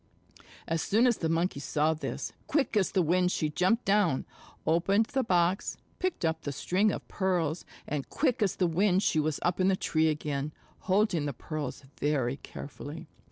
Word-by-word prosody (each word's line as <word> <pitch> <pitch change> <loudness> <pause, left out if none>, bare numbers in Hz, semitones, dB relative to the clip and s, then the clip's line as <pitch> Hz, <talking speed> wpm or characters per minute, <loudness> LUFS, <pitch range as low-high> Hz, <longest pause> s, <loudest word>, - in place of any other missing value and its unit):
As 165 0 0
soon 225 +5 +3
as 240 -3 +3
the 160 - -1
Monkey 165 -2 0
saw 150 +2 +1
this, 155 - -5
quick 285 -6 +1
as 200 -3 +2
the 185 - +2
wind 180 +2 +2
she 155 - 0
jumped 190 +9 +2
down, 195 -9 +2 0.4
opened 195 +7 +3
the 265 +3 0
box, 180 -2 +1 0.2
picked 365 - -1
up 160 0 0
the 145 - -3
string 190 +9 +1
of - - -6
pearls, 175 -4 -1 0.2
and 145 -2 -3
quick 255 -5 0
as 195 -3 +2
the 185 - +1
wind 185 +3 +2
she 155 - +2
was 155 -1 0
up 175 +1 +1
in 185 - +3
the 195 - +4
tree 160 -3 +1
again, 150 -1 -2 0.4
holding 190 -6 +2
the 140 - -2
pearls 150 +1 -5 0.2
very 135 -3 0
carefully. 145 +3 -8
170 Hz, 180 wpm, -29 LUFS, 155-195 Hz, 0.4 s, the